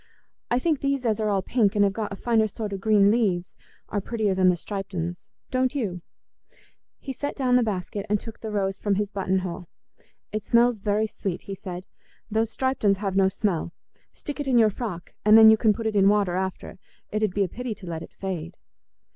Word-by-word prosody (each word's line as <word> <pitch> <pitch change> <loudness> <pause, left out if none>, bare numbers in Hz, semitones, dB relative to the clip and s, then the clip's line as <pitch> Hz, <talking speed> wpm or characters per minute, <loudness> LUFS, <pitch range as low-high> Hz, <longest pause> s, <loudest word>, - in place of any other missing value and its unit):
I 240 - +2
think 305 +2 +1
these 275 -2 0
as 220 -2 +1
are 215 -1 0
all 195 -2 +1
pink, 220 -3 +1
and 205 - +4
have 200 -1 +2
got 215 0 -3
a - - -4
finer 225 +1 +2
sort 210 0 -5
o' - - -2
green 205 0 +4
leaves, 190 -7 0 0.3
are 205 - -1
prettier 215 -1 -1
than 185 -1 +4
the 180 - +3
striped 195 +2 -6
uns, 175 +1 -4 0.2
don't 255 +1 +1
you?" 195 -10 -2 1.0
He 270 - -6
set 285 +3 -4
down 255 -3 +2
the 250 - +5
basket 200 -2 -3
and 210 0 +2
took 225 +1 -10
the 220 - -5
rose 195 -2 -1
from 205 -2 +1
his 205 +1 -1
button 190 -1 0
hole. 175 0 -6 0.6
"It 215 -1 -3
smells 235 0 +3
very 210 +2 +1
sweet," 195 -4 -4
he 195 - -6
said; 185 -1 -7 0.5
"those 220 +1 +1
striped 260 +2 -2
uns 200 -2 +4
have 195 -1 -3
no 195 -1 +5
smell. 190 -4 -1 0.4
Stick 290 0 -7
it 290 - -3
in 255 -2 +3
your 220 -2 +5
frock, 190 -6 -6
and 215 +1 +7
then 220 0 +10
you - - +7
can 220 -1 +4
put 225 +2 -4
it 220 -1 -1
in 195 -1 +5
water 200 -4 +2
after. 190 0 -4 0.3
It 215 - -1
'ud 210 -4 0
be 200 - +3
a - - 0
pity 245 +3 -5
to 195 - -12
let 165 -2 -5
it - - -10
fade." 175 -3 -5
205 Hz, 225 wpm, -25 LUFS, 190-225 Hz, 1.0 s, then